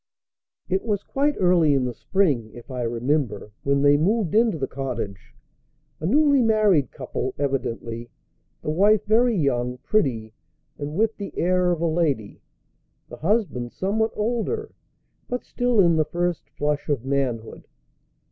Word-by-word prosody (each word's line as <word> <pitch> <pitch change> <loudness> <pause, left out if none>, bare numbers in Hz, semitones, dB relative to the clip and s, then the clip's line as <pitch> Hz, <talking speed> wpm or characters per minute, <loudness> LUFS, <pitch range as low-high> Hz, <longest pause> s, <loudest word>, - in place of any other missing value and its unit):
It 190 +1 0
was 205 -3 -1
quite 290 +2 0
early 175 -5 +4
in 130 -2 +1
the 125 - -3
spring, 145 - 0
if 120 +3 -11
I 125 -1 -3
remember, 120 -2 -1
when 140 0 +1
they 145 0 +6
moved 195 +3 +1
into 220 -4 +3
the 135 - -1
cottage 115 - -5 0.6
a 160 - -2
newly 285 +4 +4
married 215 - +3
couple, 130 0 -4
evidently: 120 -4 -3 0.5
the - - -1
wife 205 +5 +3
very 230 +2 +3
young, 125 -5 0
pretty, 125 - 0 0.5
and 145 +1 -4
with 220 +3 +1
the 200 - -7
air 180 +1 +2
of 170 -2 0
a - - +1
lady; 155 -10 -1 0.7
the - - -9
husband 160 - -1
somewhat 220 +4 0
older, 240 - -2 0.6
but 250 0 -3
still 245 -3 0
in 170 -4 +5
the 155 - +3
first 175 -1 -2
flush 150 0 -2
of 135 -4 -1
manhood. 130 -5 -2
155 Hz, 145 wpm, -24 LUFS, 130-210 Hz, 0.7 s, they